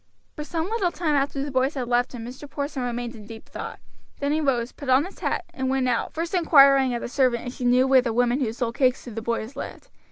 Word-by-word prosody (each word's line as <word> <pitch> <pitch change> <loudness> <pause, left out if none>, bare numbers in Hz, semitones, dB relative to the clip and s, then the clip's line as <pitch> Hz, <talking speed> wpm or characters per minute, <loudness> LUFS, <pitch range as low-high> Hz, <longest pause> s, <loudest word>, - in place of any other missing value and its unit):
For 300 - -5
some 325 +2 -3
little 405 -4 0
time 330 -4 -1
after 275 -1 0
the 285 - -4
boys 260 +3 +1
had 255 -3 -3
left 245 +2 +1
him 230 -2 -6
Mr. 260 +4 -9
Porson 285 -1 -4
remained 240 -1 -3
in 210 -2 -12
deep 225 0 -11
thought; - - -7 0.4
then 285 0 0
he 310 +1 +1
rose, 250 -4 0
put 280 - -8
on 260 +4 +5
his 380 - -11
hat, - - -1
and 260 0 -2
went 265 -1 +1
out, 250 - 0
first 330 +2 -4
inquiring 275 -7 +5
of 235 - -4
the - - -3
servant 250 -2 +1
if 245 - -5
she 255 - -5
knew 250 +1 +4
where 265 -1 +6
the 245 -2 -2
woman 245 +3 +2
who 245 -6 0
sold 230 0 -3
cakes 255 -1 +1
to 245 - -8
the 225 +1 -5
boys 235 +2 -3
lived. - - -8
260 Hz, 260 wpm, -24 LUFS, 245-285 Hz, 0.4 s, where